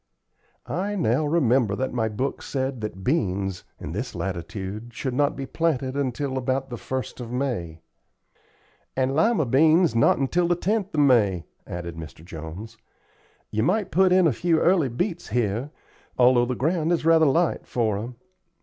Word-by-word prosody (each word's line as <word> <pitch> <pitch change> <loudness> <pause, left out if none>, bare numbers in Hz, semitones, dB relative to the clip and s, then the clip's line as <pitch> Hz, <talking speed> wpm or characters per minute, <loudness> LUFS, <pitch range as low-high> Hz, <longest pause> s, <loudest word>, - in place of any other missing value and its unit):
I 200 +4 -2
now 150 - +1
remember 130 -9 +2
that 130 +3 -2
my 110 -2 0
book 130 +6 -3
said 130 -3 -3
that 95 -3 -5
beans, 95 - -1
in - - -6
this - - -4
latitude, 100 +5 -5
should 130 - -3
not 145 +2 +1
be 135 - -5
planted 135 -4 -1
until 135 0 -1
about 130 +1 -2
the - - -3
1st 130 +3 -5
of 120 -1 -7
May." 115 - -3 1.2
"And 130 0 +1
lima 190 -1 +3
beans 155 +5 +4
not 130 +3 +3
till 175 0 +2
the 175 - +2
10th 200 +1 -1
of 150 - +3
May," 105 - +3 0.2
added 85 -2 -6
Mr. 80 0 -10
Jones. 85 +8 -8 0.7
"You 110 - 0
might 190 - +1
put 190 0 +4
in 185 -1 +5
a 155 - +3
few 165 +5 +1
early 170 -6 +3
beets 175 - -3
here, 120 +3 -1 0.5
although 125 -1 +5
the 125 - -1
ground 160 +5 0
is 170 -2 0
rather 165 -1 +5
light 165 +5 +1
for 110 -4 0
'em. 120 +3 -6
130 Hz, 165 wpm, -24 LUFS, 110-160 Hz, 1.2 s, in